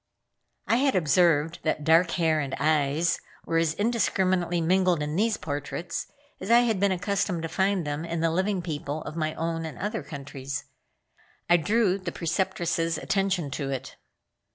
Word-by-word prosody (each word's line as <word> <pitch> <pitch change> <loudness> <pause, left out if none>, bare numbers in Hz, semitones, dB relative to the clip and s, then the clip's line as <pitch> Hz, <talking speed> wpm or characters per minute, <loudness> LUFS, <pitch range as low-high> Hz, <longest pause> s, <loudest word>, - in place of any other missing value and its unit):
I 230 - +3
had 270 -1 +2
observed 165 -1 +3
that 155 -1 -1
dark 165 +3 +5
hair 160 -2 +2
and 140 -3 -2
eyes 155 +1 +2 0.3
were 165 - 0
as 165 -1 +1
indiscriminately 185 -5 +1
mingled 180 -1 +2
in 150 +1 -3
these 220 +3 +2
portraits 145 +3 -4 0.3
as - - -6
I 235 +1 +7
had 225 -5 +1
been 200 0 +3
accustomed 190 -2 -1
to - - -1
find 190 0 0
them 145 +1 -3
in 170 0 -3
the 165 0 +2
living 185 +2 0
people 155 -2 -4
of - - -7
my 155 -1 -2
own 165 0 -2
and 160 - -6
other 215 +2 -3
countries. 140 -1 -6 0.8
I 175 - +6
drew 200 +3 +2
the 185 - -4
Preceptress' 165 -1 -1
attention 185 -7 0
to 135 0 -3
it. 135 -1 -5
170 Hz, 165 wpm, -26 LUFS, 155-190 Hz, 0.8 s, I